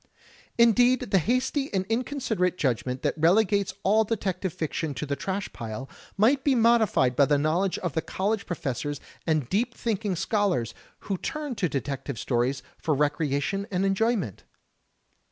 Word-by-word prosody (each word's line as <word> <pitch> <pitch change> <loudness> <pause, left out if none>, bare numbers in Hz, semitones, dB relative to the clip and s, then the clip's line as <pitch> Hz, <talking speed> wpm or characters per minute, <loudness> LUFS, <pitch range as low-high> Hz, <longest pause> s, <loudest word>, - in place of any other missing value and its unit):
Indeed, 240 0 +4
the 195 - +5
hasty 255 - 0
and 190 -1 0
inconsiderate 225 -5 -1
judgment 125 - -1
that - - +1
relegates 195 +4 +3
all 215 +3 +4
detective 190 -4 -2
fiction 155 -1 -3
to 120 - -3
the 140 -1 -2
trash 195 +5 -4
pile, 115 +3 -6 0.3
might 260 +7 +3
be 275 -2 +3
modified 225 - +3
by 140 - +5
the 145 +1 +3
knowledge 165 +6 +1
of 175 -6 -3
the 160 - 0
college 200 +5 -2
professors 145 -3 -3 0.3
and 155 -6 +1
deep 240 - 0
thinking 210 -4 -1
scholars 185 - 0 0.3
who 195 -3 -3
turn 300 -3 -4
to 200 -6 -1
detective 135 -1 -3
stories 125 +3 0 0.2
for 155 - 0
recreation 150 +6 0
and 190 0 0
enjoyment. 195 - 0
190 Hz, 150 wpm, -26 LUFS, 145-220 Hz, 0.3 s, the